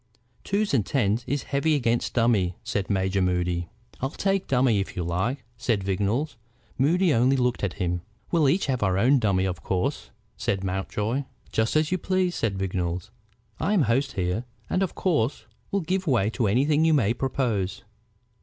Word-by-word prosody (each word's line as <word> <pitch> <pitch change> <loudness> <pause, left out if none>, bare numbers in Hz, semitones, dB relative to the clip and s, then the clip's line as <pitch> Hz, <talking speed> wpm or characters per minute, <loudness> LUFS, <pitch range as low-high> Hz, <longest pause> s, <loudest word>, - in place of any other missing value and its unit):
"Twos 205 -1 0
and 120 -6 +3
tens 115 0 0
is 140 +2 -1
heavy 150 +3 +1
against 120 -4 0
dummy," 110 -7 +2
said 105 -3 -2
Major 95 -1 +1
Moody. 90 -1 0 0.3
"I'll 135 - -1
take 195 +5 -1
dummy, 125 -5 +3
if 95 - -4
you 90 - -2
like 95 - -1
it," 130 - -29
said 115 -4 0
Vignolles. 105 +9 -1 0.4
Moody 165 +5 +3
only 130 +3 +3
looked 125 -3 0
at 95 -3 0
him. 90 -2 -1 0.3
"We'll 160 -5 +4
each 180 +8 +2
have 130 -3 -1
our 95 -2 +2
own 130 +7 +4
dummy, 95 -4 +2
of 90 -5 -3
course," 90 +4 -2 0.3
said 95 -1 -1
Mountjoy. 105 +7 -2 0.3
"Just 110 +4 +1
as 155 +1 +2
you 185 - +1
please," 185 0 +1
said 105 - -1
Vignolles. 90 0 -2 0.5
"I'm 200 -5 +2
host 130 +4 +1
here, 90 +4 -1 0.3
and 185 - +1
of 190 - -1
course 150 -8 0 0.2
will 200 - 0
give 185 +2 -1
way 115 -6 +2
to 115 -1 0
anything 145 +9 +3
you 160 -1 +4
may 115 -6 +3
propose. 120 -7 -1
115 Hz, 175 wpm, -26 LUFS, 95-145 Hz, 0.5 s, We'll